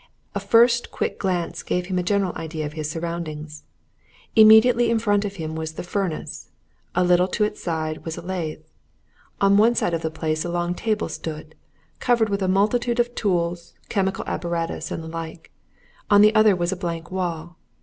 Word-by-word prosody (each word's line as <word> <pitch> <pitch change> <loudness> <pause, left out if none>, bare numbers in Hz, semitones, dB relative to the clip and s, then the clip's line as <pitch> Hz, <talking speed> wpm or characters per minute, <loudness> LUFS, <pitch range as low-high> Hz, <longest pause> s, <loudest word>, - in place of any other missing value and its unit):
A - - -1
first 235 +1 +4
quick - - -3
glance 180 -3 -2
gave 180 0 -2
him 185 0 -1
a - - +1
general 195 0 0
idea 160 -1 -5
of 150 - -6
his 155 -1 -4
surroundings. 155 -2 -5 0.7
Immediately 225 +2 +7
in 230 - +2
front 205 -2 +1
of 200 -1 -5
him 160 -3 -5
was 160 0 -4
the - - -6
furnace; 180 -3 -4 0.5
a 180 - +3
little 180 0 +4
to 210 +3 0
its 210 0 -2
side 160 -2 -3
was 165 -1 -5
a - - -7
lathe; 170 -4 -4 0.8
on 200 0 +4
one 230 +3 +5
side 175 - 0
of 165 - -1
the 160 - -1
place 155 0 -2
a 175 - -4
long 175 0 -1
table 215 +2 -1
stood, 155 -1 -7 0.5
covered 235 -3 +2
with 200 0 -1
a 190 - +1
multitude 235 +6 +1
of 240 0 +1
tools, 175 -5 -1
chemical 195 -1 -1
apparatus, 170 -1 -3
and 165 - -5
the - - -8
like; 165 0 -7 0.6
on 205 -1 +7
the 215 +1 +6
other 215 -2 +5
was 175 0 -1
a - - -1
blank 170 -2 -5
wall. 175 -3 -4
180 Hz, 190 wpm, -23 LUFS, 165-205 Hz, 0.8 s, Immediately